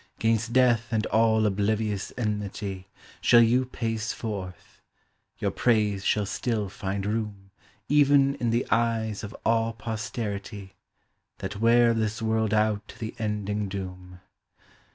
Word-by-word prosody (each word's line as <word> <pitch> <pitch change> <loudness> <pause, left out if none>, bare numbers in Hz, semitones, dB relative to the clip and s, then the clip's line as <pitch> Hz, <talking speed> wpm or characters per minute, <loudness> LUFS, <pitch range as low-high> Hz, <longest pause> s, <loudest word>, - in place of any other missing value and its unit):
'Gainst 115 0 +1
death 120 -2 +3
and 110 -2 0
all 110 0 +3
oblivious 105 0 0
enmity 100 -4 -3 0.3
Shall 120 -1 +6
you 125 +3 +3
pace 115 -3 -3
forth: 95 -5 -7 0.6
your - - -1
praise 105 -5 +1
shall 105 +1 +1
still 105 -1 -2
find 100 +1 -4
room 105 -2 -3 0.4
Even 140 -1 +4
in 120 - -1
the 120 +2 +1
eyes 115 -2 0
of 105 - -7
all 115 0 +2
posterity, 105 -3 -5 0.6
That 100 +2 -5
wear 115 +1 +5
this 110 -1 -1
world 110 -1 0
out 105 -1 +1
to - - -12
the 110 -1 -5
ending 105 -1 -2
doom. 90 -2 -7
110 Hz, 130 wpm, -26 LUFS, 100-115 Hz, 0.6 s, Shall